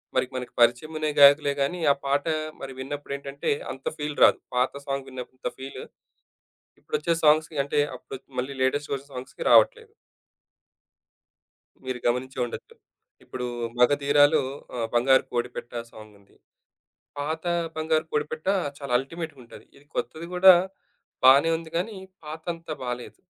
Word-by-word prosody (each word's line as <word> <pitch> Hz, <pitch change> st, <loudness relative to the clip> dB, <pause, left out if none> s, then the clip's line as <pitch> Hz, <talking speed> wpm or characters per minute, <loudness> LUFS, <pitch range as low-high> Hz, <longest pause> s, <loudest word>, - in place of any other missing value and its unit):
మరి -, -, +3 dB
మనకి 125 Hz, -1 st, -5 dB
పరిచయం 120 Hz, +7 st, +3 dB
అనే 155 Hz, 0 st, 0 dB
గాయకులే 140 Hz, 0 st, +7 dB
కానీ 175 Hz, +6 st, 0 dB
ఆ -, -, -10 dB
పాట 140 Hz, +1 st, +1 dB, 0.4 s
మరి 135 Hz, -1 st, -6 dB
విన్నప్పుడు 140 Hz, +1 st, -5 dB
ఏంటంటే 140 Hz, 0 st, -3 dB, 0.2 s
అంత 135 Hz, -, -10 dB
ఫీల్ 150 Hz, 0 st, -4 dB
రాదు. -, -, +6 dB, 0.2 s
పాత 125 Hz, +1 st, +2 dB
సాంగ్ 135 Hz, -1 st, -3 dB
విన్నప్పుడు 130 Hz, 0 st, -9 dB
అంత 125 Hz, -, -3 dB
ఫీల్, 135 Hz, +1 st, -7 dB, 1.0 s
ఇప్పుడు -, -, -2 dB
వచ్చే 170 Hz, +2 st, +1 dB
సాంగ్స్‌కి 155 Hz, 0 st, +4 dB
అంటే 145 Hz, +1 st, +1 dB, 0.2 s
అప్పుడు 135 Hz, +1 st, -9 dB, 0.2 s
మళ్ళీ 135 Hz, +2 st, -5 dB
లేటెస్ట్ 145 Hz, +2 st, 0 dB
వచ్చిన 140 Hz, +1 st, -8 dB
సాంగ్స్‌కి 130 Hz, -, -7 dB
రావట్లేదు. 455 Hz, -2 st, +4 dB, 1.9 s
మీరు 130 Hz, -1 st, -4 dB
గమనించె 130 Hz, +2 st, -1 dB
ఉండొచ్చు. 120 Hz, -, -9 dB, 0.5 s
ఇప్పుడు 125 Hz, -1 st, -5 dB, 0.3 s
మగధీరాలో 145 Hz, +3 st, +4 dB, 0.3 s
ఆహ్, 115 Hz, -2 st, -1 dB
బంగారు 130 Hz, +2 st, +5 dB
కోడిపెట్ట 120 Hz, 0 st, -3 dB, 0.2 s
సాంగ్ 110 Hz, -1 st, -13 dB
ఉంది. 100 Hz, -, -26 dB, 0.8 s
పాత 160 Hz, +3 st, -3 dB, 0.3 s
బంగారు 155 Hz, 0 st, +1 dB
పొడిపెట్ట 155 Hz, +3 st, -3 dB, 0.3 s
చాలా 140 Hz, -3 st, -5 dB
అల్టిమేట్‌గా 155 Hz, +1 st, -6 dB
ఉంటది. -, -, -14 dB
ఇది 140 Hz, -, -19 dB
కొత్తది 160 Hz, +8 st, -4 dB
కూడా. 185 Hz, 0 st, +9 dB, 0.7 s
బానే 140 Hz, +5 st, +7 dB
ఉంది. 165 Hz, -1 st, -11 dB
కానీ 195 Hz, +4 st, -2 dB, 0.3 s
పాతంతా 160 Hz, +1 st, -6 dB
బాలేదు. 125 Hz, 0 st, -5 dB
140 Hz, 135 wpm, -26 LUFS, 130-155 Hz, 1.9 s, కూడా